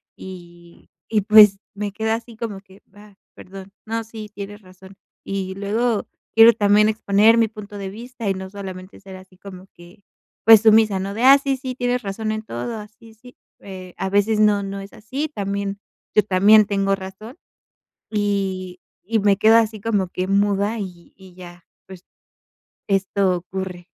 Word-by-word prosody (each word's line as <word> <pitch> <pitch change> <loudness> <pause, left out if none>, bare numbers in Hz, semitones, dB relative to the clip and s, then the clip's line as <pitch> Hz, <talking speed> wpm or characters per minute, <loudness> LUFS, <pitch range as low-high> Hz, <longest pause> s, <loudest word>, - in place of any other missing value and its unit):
y 175 -2 -13 0.2
y, 210 - +3
pues, 210 -1 +7 0.2
me 205 0 -4
quedo 220 +2 -2
así 230 0 -7
como 210 -4 -6
que: 190 0 -20
"Va, 205 -1 -17 0.2
perdón, 190 +1 -12
no, 225 +1 -3
sí, 220 -1 -10
tienes 205 +1 -9
razón". 190 +1 -16 0.3
Y 190 -1 -4
luego 215 +3 -1 0.3
quiero 225 +1 +8
también 210 0 +3
exponer 215 +1 +3
mi 225 -2 +2
punto 210 -1 -10
de 195 -1 -6
vista 235 +1 -7
y 195 - +1
no 190 0 -7
solamente 190 -1 -9
ser 190 -1 -11
así 185 0 -18
como 190 -1 -12
que, 175 +4 -17 0.4
pues 225 -2 +8
sumisa, 220 -3 +4
¿no?, 195 +1 -4
de: 230 - -4
"Ah, 270 +2 +8
sí, 275 -1 -2
sí, 255 -1 -6
tienes 245 0 -1
razón 215 +2 -4
en 215 0 -4
todo". 220 - -6
"Ah 210 - -9
sí, 225 +1 -19
sí", 250 +3 -17 0.2
eh, 185 -2 -10
a 190 - -3
veces 205 +2 +1
no, 205 -1 +3
no 195 0 -6
es 195 0 -11
así, 265 +8 -5
también 200 -4 -4 0.4
yo 210 - +5
también 205 +2 +5
tengo 195 -1 0
razón 195 - -11 0.7
y 195 -3 -2 0.3
y 225 -1 +1
me 200 -1 +2
quedo 220 +2 +5
así 220 -1 0
como 205 -5 0
que 185 +1 -4
muda 200 +2 0
y 180 -4 -9
y 190 -2 -17
ya, 175 -1 -13 0.2
pues, 185 -2 -13 0.8
esto 195 -1 +1
ocurre. 180 0 -7
200 Hz, 175 wpm, -21 LUFS, 190-220 Hz, 0.8 s, quiero